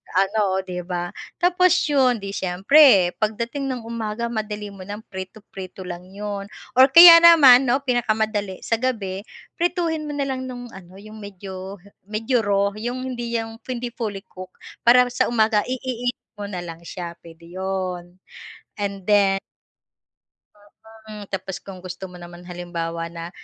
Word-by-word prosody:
ano, 195 0 +1
'di 180 -1 -6
ba? 175 -1 -3 0.3
Tapos 360 +1 +4 0.2
'yon, 255 -4 +3
di 195 - -4
siyempre 190 +1 +5
pagdating 235 +5 -2
ng 255 -3 -4
umaga 230 0 -3
madali 210 -2 -4
mo 195 -1 -11
ng 205 +2 -7
prito-prito 190 -1 -9
lang 175 0 -7
'yon 205 -1 -5 0.3
or 260 - +9
kaya 335 +3 +11
naman 280 -7 +8
'no 250 +3 +2
pinakamadali 220 -6 -1
sa 230 - +1
gabi, 205 -6 -3 0.4
prituhin 340 -2 0
mo - - -4
na 280 -1 -1
lang 260 -1 -3
nung 245 -1 -7
ano 185 -2 -13
yung 215 +1 -12
medyo 190 0 -8 0.3
medyo 225 +4 0
raw 200 0 +2
yung 240 +4 -4
hindi 240 -2 -3
yung 225 0 -7
hindi 245 -1 -3
fully 210 -5 -4
cook, 185 0 -11 0.4
para 250 +1 +7
sa 255 - +1
umaga 220 -2 +2
i-init 250 -1 -3 0.3
mo 205 - -3
na 190 - -5
lang 165 -1 -9
siya, 170 -1 -6
pwede 165 0 -15
'yon 185 -2 -4 0.6
and 200 -1 -4
then 200 -2 +4 1.7
Mm, 210 -1 -9
tapos 190 -1 -5
kung 195 -2 -10
gusto 185 +1 -8
mo 180 - -12
naman 175 0 -11
halimbawa 170 -2 -5
na 170 0 -7
210 Hz, 150 wpm, -22 LUFS, 185-245 Hz, 1.7 s, kaya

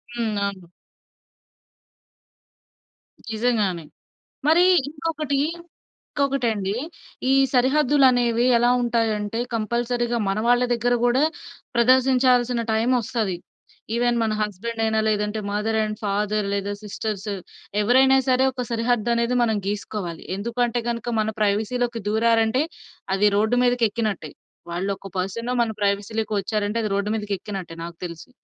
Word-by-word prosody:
హ్మ్. 225 -3 -1
అవును. 185 -4 -6 2.6
నిజంగానే. 215 -8 0 0.6
మరి 330 +3 +6 0.3
ఇంకొకటి. 305 -2 -2 0.8
ఇంకొకటండి. 235 -8 0 0.6
ఈ - - +5 0.2
సరిహద్దులనేవి 255 -3 +3
ఎలా 240 +1 +3
ఉంటాయంటే, 225 -2 0 0.2
కంపల్సరిగా 235 +2 -1
మన 195 +2 0
వాళ్ళ 245 +1 +4
దగ్గర 240 +1 +1
కూడా 250 +3 +3 0.5
ప్రదర్శించాల్సిన 250 0 +3
టైమొస్తది. 225 -4 0 0.6
ఈవెన్ 240 0 +2
మన 220 -1 0
హస్బెండ్ 220 +3 -4
అయినా. 220 0 +1
లేదంటే 210 0 0
మదర్ 215 +2 0
అండ్ 215 0 -2
ఫాదర్ 205 +1 0
లేదా 200 0 -2
సిస్టర్స్. 210 0 -4 0.5
ఎవరైనా 260 +4 +5
సరే, 255 0 +4
ఒక 250 -1 -4
సరిహద్దనేది 235 +1 +1
మనం 220 -2 +2
గీసుకోవాలి. 200 -4 -4
ఎందుకు 230 +4 -5
అంటే 240 0 -2
గనక, 235 -1 -3
మన 215 - 0
ప్రైవసీలోకి 230 +3 0
దూరారంటే, 225 +3 +2 0.5
అది 205 +2 +4
రోడ్డు 220 +4 +2
మీదకెక్కినట్టే. 225 -8 0 0.4
వాళ్ళొక 195 +3 -3
పర్సనో 230 +7 -2
మన 225 - -1
ప్రైవసీలోకి 205 +2 -1
వచ్చారంటే, 210 +2 -2
అది - - 0
రోడ్డు 200 +1 -1
మీదకెక్కినట్టే 200 -4 -5
నాకు 170 0 -8
తెలిసి. 170 +7 -8
225 Hz, 110 wpm, -23 LUFS, 205-245 Hz, 2.6 s, మరి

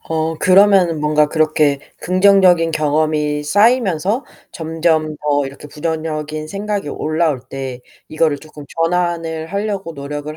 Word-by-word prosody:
어 160 0 -2
그러면은 185 -4 +4
뭔가 150 0 +3
그렇게 155 -3 +2 0.2
긍정적인 185 -2 +4
경험이 150 -1 0
쌓이면서 205 - +2 0.3
점점 160 -1 -1
더 145 -1 0
이렇게 140 +2 -11
부정적인 155 0 -4
생각이 200 -3 -3
올라올 155 -3 -1
때 130 -2 -6 0.3
이거를 155 -2 0
쪼끔 150 0 -12 0.2
전환을 165 -2 -1
하려고 200 -1 -3
노력을 145 +1 -6
160 Hz, 300 characters per minute, -17 LUFS, 150-180 Hz, 0.3 s, 그러면은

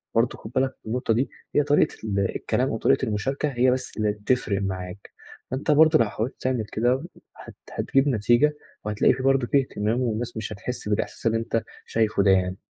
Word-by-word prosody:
برضه 115 +2 +2
خد 110 - -10
بالك 130 0 +1
النقطة 115 +1 0
دي 125 +5 0 0.3
هي 145 - +5
طريقة 145 +2 +2
ال 100 -2 -1 0.2
الكلام - - 0
أو - - -2
طريقة - - +2
المشاركة 135 +8 -1
هي 125 -1 +3
بس 130 +1 -3
اللي 105 -1 +1
بتفرق 105 -1 -1
معاك، 95 0 -5 0.4
أنت 135 +3 0
برضه 155 +1 +6
لو 115 - +4
حاولت 110 +5 -3
تعمل 130 -4 0
كده 125 +5 +1 0.3
هت - - -12 0.2
هتجيب 135 +1 +1
نتيجة، 120 +4 +3 0.3
وهتلاقي 105 -1 +3
في 130 +1 -5
برضه 135 -2 +3
في 140 - +4
اهتمام 115 -1 -2
والناس 115 -1 -2
مش 110 -1 -4
هتحس 115 +3 -6
بالاحساس 105 +2 -2
اللي 115 0 +2
أنت 115 0 -1 0.2
شايفُه 110 -3 +1
ده 100 - +5
يعني. 95 0 +1
115 Hz, 190 wpm, -25 LUFS, 105-130 Hz, 0.4 s, برضه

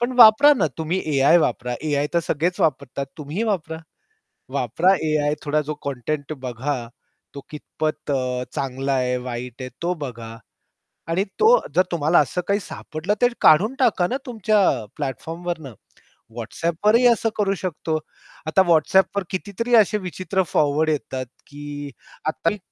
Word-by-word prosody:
पण 240 +2 0
वापरा 240 +5 +8
ना 190 - +1
तुम्ही 160 +3 -1 0.2
एआय 140 +5 +6
वापरा. 125 -6 -1
एआय 145 -1 +1
तर 170 - +4
सगळेच 170 +2 -1
वापरतात 140 -3 -1
तुम्हीही 155 +8 -4
वापरा. 175 -7 -2 0.8
वापरा 185 +3 +2
एआय 150 -1 +1
थोडा 150 +1 +1
जो 155 - -2
कंटेंट 140 +3 -3
बघा, 130 +4 -2 0.6
तो 140 - -8
कितपत 155 0 -4
अ, 125 -2 -1
चांगला 135 +1 -2
आहे, 125 -1 +1
वाईट 125 0 -6
आहे, 130 - -5
तो 175 +1 0
बघा. 115 -3 -7 0.7
आणि 180 +4 +1 0.2
तो 440 - +6 0.3
जर 185 - +5
तुम्हाला 165 0 +2
असं 150 +5 -1
काही 200 +1 +2
सापडलं, 170 +2 -4
तर 245 0 +4
काढून 205 +12 +5
टाका 220 -9 +3
ना 255 - -1
तुमच्या 220 -3 +1 0.4
प्लॅटफॉर्मवरनं 160 0 -5 0.6
WhatsAppवरही 170 - +1
असं 230 0 0
करू 200 -2 +1
शकतो. 165 -3 -3 0.5
आता 155 +5 +4
WhatsAppवर 190 +5 +3
कितीतरी 205 +5 -2
असे 215 -2 +5
विचित्र 185 0 -2
फॉरवर्ड 150 +1 +2
येतात, 130 -3 -3 0.2
की 145 0 -8 0.4
आता 160 +1 0
मी 210 - -5
155 Hz, 145 wpm, -22 LUFS, 140-190 Hz, 0.8 s, वापरा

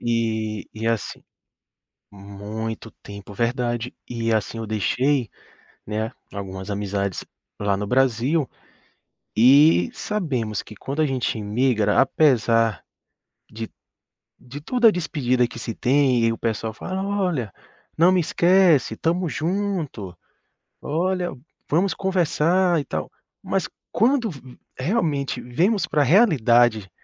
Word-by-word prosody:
E 110 -2 -1
e, 110 +1 -4
assim 115 -2 -2 0.9
muito 105 +3 -6
tempo, 100 0 -10
verdade. 120 +1 -1 0.2
E 115 -1 -1
assim 110 +1 -1
eu 115 - -5
deixei, 125 +4 +1 0.6
né, 110 +2 -3 0.2
algumas 95 -1 -7
amizades 100 -2 -3 0.3
lá 100 -1 +1
no 105 +1 -3
Brasil 130 +5 +1 0.9
e 130 - +6
sabemos 130 - -2
que 110 - -12
quando 140 +3 -3
a - - +4
gente 130 -4 -1
imigra, 110 0 +1
apesar 115 - +2 0.7
de 110 +1 -6 0.7
de 130 +4 -10
toda 240 - +3
a - - +7
despedida 135 -9 0
que 115 - -10
se 115 -1 -5
tem 130 -2 +2
e 115 - +3
o - - -4
pessoal 110 -1 -2
fala: 190 +10 -4
"Olha, 180 - -1 0.5
não 170 +3 +6
me 185 - +3
esquece, 175 -2 +3
tamo 175 +2 0
junto. 160 - -3 0.7
Olha, 180 +4 -1 0.4
vamos 180 +6 +2
conversar, 180 -1 +2
e - - -5
tal", 80 - -4 0.3
mas - - -1 0.2
quando 240 -1 +2
v 130 -5 -12 0.2
realmente 145 - -1
vemos 175 - +1
pra 150 -1 +1
realidade 120 - +4
125 Hz, 120 wpm, -23 LUFS, 110-165 Hz, 0.9 s, a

